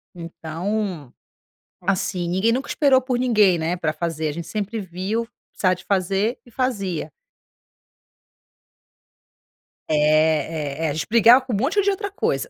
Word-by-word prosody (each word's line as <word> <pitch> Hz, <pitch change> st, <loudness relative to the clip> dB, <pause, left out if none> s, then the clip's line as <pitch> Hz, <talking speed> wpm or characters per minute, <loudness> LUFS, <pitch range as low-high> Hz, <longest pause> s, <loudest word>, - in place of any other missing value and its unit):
Então, 170 Hz, -, -4 dB, 0.7 s
assim, 180 Hz, -1 st, -1 dB
ninguém 190 Hz, +6 st, +2 dB
nunca 260 Hz, +3 st, -2 dB
esperou 275 Hz, -3 st, +4 dB
por 250 Hz, -1 st, -1 dB
ninguém, 210 Hz, -8 st, +3 dB
né, 165 Hz, +2 st, -1 dB
pra 160 Hz, -3 st, -1 dB
fazer, 160 Hz, -1 st, -3 dB
a -, -, -2 dB
gente 165 Hz, +2 st, -6 dB
sempre 215 Hz, +1 st, -3 dB
viu, 195 Hz, +5 st, -3 dB, 0.3 s
precisava 185 Hz, -1 st, +1 dB
de -, -, -15 dB
fazer, 195 Hz, +4 st, 0 dB
e 240 Hz, -, -18 dB
fazia. 200 Hz, -, -2 dB, 2.8 s
É, -, -, +1 dB, 0.9 s
é -, -, +1 dB
é, -, -, +1 dB
a -, -, -2 dB
gente 155 Hz, -, -3 dB
brigava 235 Hz, +2 st, +7 dB
com 250 Hz, -, -4 dB
um -, -, +2 dB
monte 275 Hz, -, +1 dB
de 405 Hz, -, +2 dB
outra 400 Hz, 0 st, -2 dB
coisa, 400 Hz, -, -1 dB
195 Hz, 150 wpm, -22 LUFS, 170-235 Hz, 2.8 s, brigava